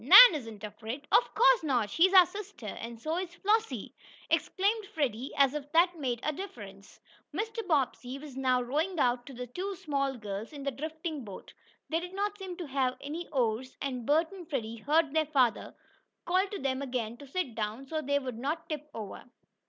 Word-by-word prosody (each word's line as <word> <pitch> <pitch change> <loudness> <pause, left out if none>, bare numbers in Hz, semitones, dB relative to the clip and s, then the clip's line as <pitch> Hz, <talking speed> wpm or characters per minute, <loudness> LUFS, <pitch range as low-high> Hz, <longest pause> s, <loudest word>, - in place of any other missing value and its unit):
"Nan - - +11
isn't 225 -8 -6
afraid." 220 +7 -6
"Of - - +5
course - - +6
not 255 -8 +1
she's 365 - +5
our 375 -2 +9
sister, 400 - -8
and 230 +3 -6
so 315 +7 -2
is 355 -2 -5
Flossie!" 440 +4 0 0.4
exclaimed 410 +2 +1
Freddie, 275 - -2
as 275 -1 +5
if 295 -1 -5
that 345 +2 +5
made 255 -7 -2
a 305 - 0
difference! 205 - -9 0.3
Mr. 445 -1 -3
Bobbsey 265 -4 0
was 280 -2 -10
now 255 -2 +2
rowing 310 +9 -1
out 245 0 +2
to 275 - -8
the 250 +1 -5
two 370 +11 -4
small 275 -5 -1
girls 210 +4 -6
in 285 -2 -7
the 275 - 0
drifting 315 +1 -5
boat. 200 -4 -10 0.4
They 325 - +1
did 360 +2 -7
not 410 +1 -1
seem 370 -2 -6
to 350 - -5
have 265 -3 0
any 320 +5 -5
oars, 255 -2 -1
and 255 -3 -3
Bert 320 +4 +3
and 365 -4 -10
Freddie 230 -5 -3
heard 300 +5 +2
their 315 -1 +2
father 260 -6 +1 0.5
call 370 +3 +2
to 405 - -5
them 265 -3 -1
again 245 -4 -3
to 285 - -12
sit 285 -3 -2
down, 220 +4 -3
so 310 +3 -2
they 285 0 +1
would 255 -5 -4
not 310 +6 -2
tip 300 -1 -4
over. 210 -3 -7
285 Hz, 195 wpm, -30 LUFS, 250-345 Hz, 0.5 s, Nan